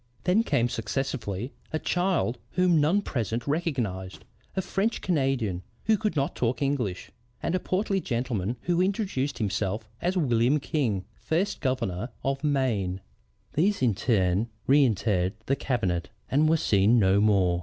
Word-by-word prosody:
Then 190 +5 +4
came 135 - +1
successively 120 -1 -3 0.2
a 155 - 0
child 175 -8 0
whom 180 -4 +4
none 180 +8 +3
present 120 - -2
recognized, 125 - -2 0.3
a 190 - +1
French 205 +6 0
Canadian 135 - 0 0.2
who 220 - +4
could 210 -4 -1
not 140 -1 0
talk 120 0 0
English, 125 -10 -2 0.3
and 165 - 0
a 185 - +2
portly 195 +1 0
gentleman 120 - -2
who 175 0 +1
introduced 185 -8 -1
himself 105 0 -2
as 180 +2 0
William 125 -2 +3
King, 115 -11 -1
first 185 - -1
Governor 120 -5 -1
of 135 +1 -1
Maine. 115 -11 0 0.5
These 195 +2 +2
in 120 -4 +4
turn 100 0 +1 0.2
reëntered 110 -9 +3
the 135 - +2
cabinet 95 -12 -1 0.2
and 150 +3 +4
were 165 - +4
seen 105 -3 +3
no 100 -2 +4
more. 95 -5 +3
130 Hz, 145 wpm, -27 LUFS, 105-160 Hz, 0.5 s, Then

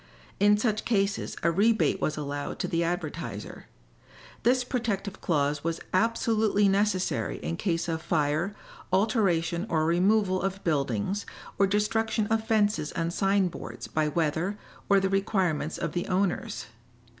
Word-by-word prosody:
In 205 +1 +5
such 215 -1 0
cases 200 -3 0
a 170 - +4
rebate 215 +5 +2
was 155 - -1
allowed 145 -1 -4
to - - -2
the 170 0 0
advertiser. 170 -1 -4 0.7
This 250 +1 +3
protective 215 -6 -3
clause 145 -3 0
was 165 0 -1
absolutely 220 0 +2
necessary 195 -1 +1
in 165 - -2
case 170 -2 -1
of 160 -1 -2
fire, 160 +5 0 0.4
alteration 185 -3 +1
or 155 -1 +1
removal 185 +3 +2
of 195 +1 -3
buildings 145 - -1 0.3
or 195 - +5
destruction 210 +2 +1
of 225 0 +2
fences 205 -8 +2
and 170 0 -2
sign 195 0 +2
boards 175 - -7
by 155 -1 0
weather 165 +5 0 0.3
or 200 -1 +6
the 195 - +1
requirements 190 -5 0
of - - -2
the 175 - -2
owners. 185 - -1
190 Hz, 140 wpm, -27 LUFS, 165-210 Hz, 0.7 s, or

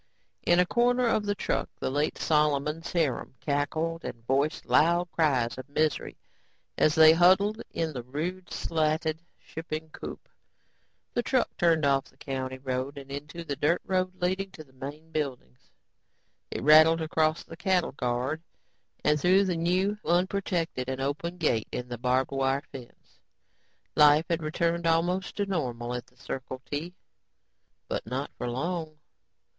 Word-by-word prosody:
In 175 0 +5
a 180 - +5
corner 245 +4 +2
of 215 -3 +1
the 205 - +1
truck, - - -1
the - - -2
late 145 +2 0
Solomon's 150 +1 +1
harem 150 -7 -1
cackled 155 +3 -1
and 115 -2 -7
voiced 140 +4 0
loud 170 +2 +3
cries 130 -7 +1
of 130 - -9
misery 155 +2 0 0.6
as 155 - +3
they 160 0 +8
huddled 190 +6 +4
in 160 -2 -2
the 125 - -4
rude, 165 +9 -5
slatted 160 0 0 0.2
shipping 160 -1 -7
coop. - - -8 0.9
The 240 - +1
truck 255 0 0
turned 165 -3 +3
off 135 -1 +2
the - - -22
county 130 -1 -4
road 130 +2 -3
and 140 -1 -9
onto 145 +4 -6
the 145 -4 -3
dirt 155 +6 +2
road 185 -1 0
leading 190 +2 0
to 155 - -10
the 135 -3 -25
main 145 +5 -8
buildings. 130 - -5 0.8
It - - -4
rattled 155 +2 +7
across 155 0 +1
the - - -11
cattle 180 0 +1
guard 125 +4 -2 0.6
and 150 0 +3
through 185 +2 +5
the 180 -2 0
new 185 +5 +1
unprotected 175 -6 0
and 130 0 -3
open 150 +6 -2
gate 120 -10 +1
in 125 0 -4
the 120 -2 -5
barbed 125 +2 +1
wire 135 +1 0
fence. 125 -3 -13 0.8
Life 150 +1 +6
had 170 0 +1
returned 170 +2 0
almost 175 +3 +1
to 205 - 0
normal 125 -10 -2
at 125 0 -5
the 125 - -27
Circle 130 +1 -6
T. 160 +5 -4 0.9
But - - -3
not 130 +4 -3
for 125 - -2
long. 160 +4 -3
155 Hz, 155 wpm, -28 LUFS, 135-175 Hz, 0.9 s, they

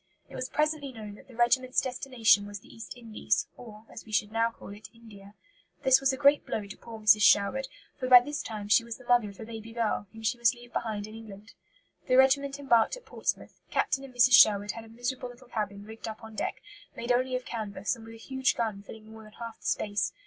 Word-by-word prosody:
It - - -17
was 255 - -4
presently 300 -2 -1
known 215 -4 -9
that 205 - -16
the 255 - -15
regiment's 255 +2 +2
destination 245 -6 +2
was 205 -1 -8
the - - -16
East 225 +2 -9
Indies, 220 -3 -1
or, 220 -2 -12
as - - -10
we 220 - -14
should 210 0 0
now 230 +1 +2
call 230 - -13
it, 205 +2 -11
India. 205 -3 -15 0.5
This 265 0 +6
was 270 0 +3
a 265 - -4
great 285 +1 +4
blow 210 - -4
to 200 - -9
poor 230 -1 -11
Mrs. 215 0 +5
Sherwood, 210 +7 +4 0.3
for 255 - -2
by 250 -1 +10
this 295 +4 -4
time 215 -2 -6
she 225 +3 +5
was 230 -1 -7
the 255 - -16
mother 240 -3 +3
of 200 - -14
a 225 - -7
baby 225 0 -9
girl, 225 -3 -1
whom 225 0 -12
she 240 +2 0
must 235 +2 +3
leave 240 0 -15
behind 215 -3 -3
in 215 - -11
England. 215 -1 -12 0.5
The 255 - +3
regiment 275 +1 +4
embarked 270 - +2
at - - -16
Portsmouth. - - -4
Captain 270 - 0
and 265 -2 -12
Mrs. 245 +1 +5
Sherwood 205 -3 +7
had 230 +2 -9
a - - -15
miserable 245 +2 -4
little 245 0 -15
cabin 205 -3 -4
rigged 220 +1 -9
up 220 +1 -8
on 220 0 -10
deck, - - -4 0.3
made 235 +1 -2
only 255 +1 +1
of 255 - -4
canvas, 215 -1 -3
and 230 - -13
with 225 0 -11
a - - -12
huge 265 +2 -1
gun 215 -4 -2
filling 215 +1 -12
more 220 0 -11
than 215 -1 -15
half 230 -1 -8
the - - -7
space. 205 -2 -1
230 Hz, 240 wpm, -28 LUFS, 215-255 Hz, 0.5 s, by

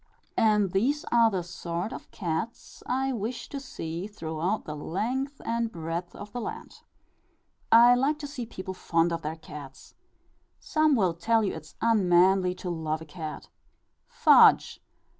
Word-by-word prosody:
And 210 -4 +3
these 260 +11 +1
are 230 -1 +5
the 190 -4 -2
sort 175 +2 -4
of - - -9
cats 175 +5 -5
I 265 +1 0
wish 235 +2 -4
to 280 - -5
see 175 - -6
throughout 175 0 -3
the 150 - -5
length 245 - -3
and 230 0 -1
breadth 170 +1 -5
of 205 0 -9
the 245 - -4
land. 220 - -7 0.9
I 240 +2 +8
like 275 +5 +1
to 295 -1 -6
see 255 -5 -6
people 190 -3 -6
fond 170 -2 +1
of 165 - -3
their 155 +1 -4
cats. 145 -4 -11 0.7
Some 310 -2 +2
will 185 -7 +2
tell 220 +7 +1
you 195 - -1
it - - -6
is - - -17
unmanly 185 -4 +4
to 180 - -6
love 160 -1 -3
a - - -12
cat. 155 -1 -7 0.6
Fudge! - - +5
195 Hz, 160 wpm, -27 LUFS, 165-235 Hz, 0.9 s, I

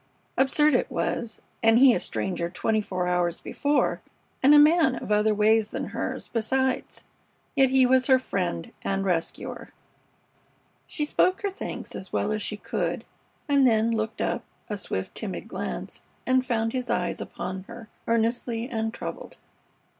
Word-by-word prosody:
Absurd 295 +3 +3
it 245 - +2
was, 225 -2 -3 0.2
and 225 0 +5
he 260 0 +7
a - - +1
stranger 175 -3 -2
twenty 215 +4 0
hours 180 -1 0
before, 290 +1 0 0.4
and 270 - +6
a - - +9
man 310 -2 +5
of 215 - -6
other 210 +1 +3
ways 215 +1 +3
than - - -4
hers, - - -4
besides. 260 +3 -1 0.5
Yet 270 -2 +5
he 265 0 +5
was 255 0 +3
her 260 -2 +6
friend 180 -9 -3
and 195 0 -1
rescuer. 170 -3 -3 1.2
She 300 - -1
spoke 370 +6 +2
her 400 - 0
thanks 385 - -6
as 190 - -7
well 210 - 0
as 215 0 -1
she 210 - -3
could, - - -3 0.4
and 280 -2 +4
then 225 0 +3
looked 220 0 -2
up, - - -1 0.3
a - - 0
swift, - - -4
timid - - -5
glance, - - -5 0.2
and 260 0 +3
found 225 -3 -1
his 255 -1 -3
eyes - - -1
upon 190 +1 -6
her 235 0 -10 0.2
earnestly 230 +1 0
and 225 -3 -2
troubled. - - -7
230 Hz, 155 wpm, -26 LUFS, 210-260 Hz, 1.2 s, a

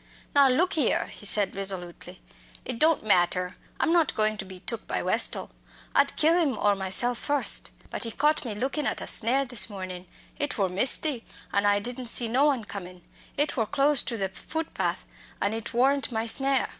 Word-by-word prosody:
"Now 280 -2 +5
look 330 +9 +1
here," 295 -7 +1
he 205 - -4
said 200 -2 +1
resolutely, 185 -2 -2 0.4
"it 250 -2 -4
don't 315 -7 +2
matter. 180 -2 +1 0.2
I'm 330 - +1
not 335 -4 +2
goin' 215 0 +2
to 195 - -5
be 190 -1 -11
took 230 +4 -3
by - - -3
Westall. - - +2 0.4
I'd 280 0 +2
kill 325 +3 +3
him 285 -6 -1
or 205 -1 +2
myself 200 +5 +1
first. 290 -1 +1 0.2
But - - 0
he - - -3
caught 295 +7 0
me 230 -5 -5
lookin' 270 +6 -2
at - - -2
a - - -7
snare 260 +5 +3
this 245 -3 +3
mornin' 185 -2 -8 0.3
it 290 0 -3
wor 195 -3 0
misty, 250 - +2 0.3
and 200 0 +1
I 205 0 +3
didn't 245 +4 -4
see 235 0 +3
no 255 +5 +2
one 275 -6 +1
comin'. 180 -3 -10 0.3
It 290 +1 0
wor 225 -5 -1
close 280 +3 +2
to 235 - -3
the 195 -2 -2
footpath, 320 - -4 0.3
and 200 +2 -1
it 225 -1 -6
worn't 270 +3 +1
my 225 -1 -2
snare." 270 +3 +2
230 Hz, 195 wpm, -26 LUFS, 200-275 Hz, 0.4 s, Now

